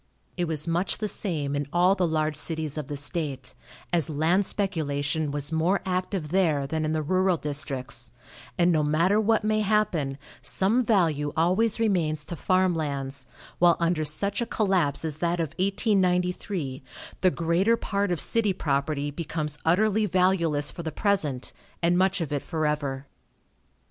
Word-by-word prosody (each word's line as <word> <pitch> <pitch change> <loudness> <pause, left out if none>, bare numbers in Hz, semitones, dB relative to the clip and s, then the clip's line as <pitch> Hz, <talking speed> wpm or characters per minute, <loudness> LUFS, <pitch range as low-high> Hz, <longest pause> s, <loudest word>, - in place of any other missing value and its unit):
It 175 - -1
was 155 -2 -1
much 170 +3 0
the 215 - -2
same 150 -9 -2
in 145 0 -2
all 180 +2 +4
the 185 -3 +1
large 155 -1 0
cities 155 -3 -3
of 150 -4 -4
the 145 -1 -4
state, 145 -3 -4 0.4
as 170 -1 +2
land 165 +6 +1
speculation 155 -6 -1
was 145 +1 -3
more 165 +5 +2
active 185 -3 -2
there 160 -6 +2
than 155 +2 -2
in 155 - -1
the 155 -1 -1
rural 185 +2 +2
districts, 140 -5 -2 0.5
and 175 -1 +4
no 155 -2 +2
matter 165 +8 +2
what 220 0 +2
may 215 0 +1
happen, 200 -10 0 0.2
some 220 +7 +1
value 160 -10 +1
always 195 +8 +2
remains 165 -9 0
to 170 - -5
farm 185 +2 +2
lands, 140 -4 -4 0.3
while 175 -1 +5
under 170 -2 +1
such 200 +8 -1
a 235 - -1
collapse 185 -10 +1
as 155 -2 -2
that 170 +1 0
of 165 -3 -1
1893 180 - 0 0.4
the 185 - +5
greater 175 +7 +1
part 200 -2 -1
of 175 - 0
city 220 -4 +3
property 145 -2 -1
becomes 150 -1 -4
utterly 210 +5 +3
valueless 175 -5 +2
for - - -7
the 160 -1 -4
present, 155 - -1 0.3
and 170 +1 +3
much 190 +1 +2
of 150 -3 -3
it 145 - -1
forever. 150 -4 -2
165 Hz, 160 wpm, -26 LUFS, 150-190 Hz, 0.5 s, while